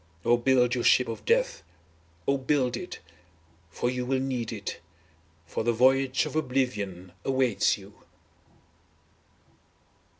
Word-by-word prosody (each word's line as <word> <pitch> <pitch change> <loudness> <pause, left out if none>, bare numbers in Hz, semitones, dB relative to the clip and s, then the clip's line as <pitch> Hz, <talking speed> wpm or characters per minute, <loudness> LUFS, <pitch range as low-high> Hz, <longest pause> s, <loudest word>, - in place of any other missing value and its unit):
Oh 120 +1 +5
build 125 0 +3
your 125 -2 -1
ship 125 - +5
of 115 - -6
death. - - +1 0.7
Oh 140 0 +2
build 130 -2 +1
it! 175 +9 -7 0.7
for 100 - -2
you 125 0 -1
will 130 +1 0
need 130 -4 -2
it. 100 -4 -5 0.7
For 85 - -3
the 120 +1 +2
voyage 130 +2 +3
of - - -6
oblivion 105 - -2
awaits 130 -7 +2
you. 100 0 -14
125 Hz, 125 wpm, -27 LUFS, 115-135 Hz, 0.7 s, Oh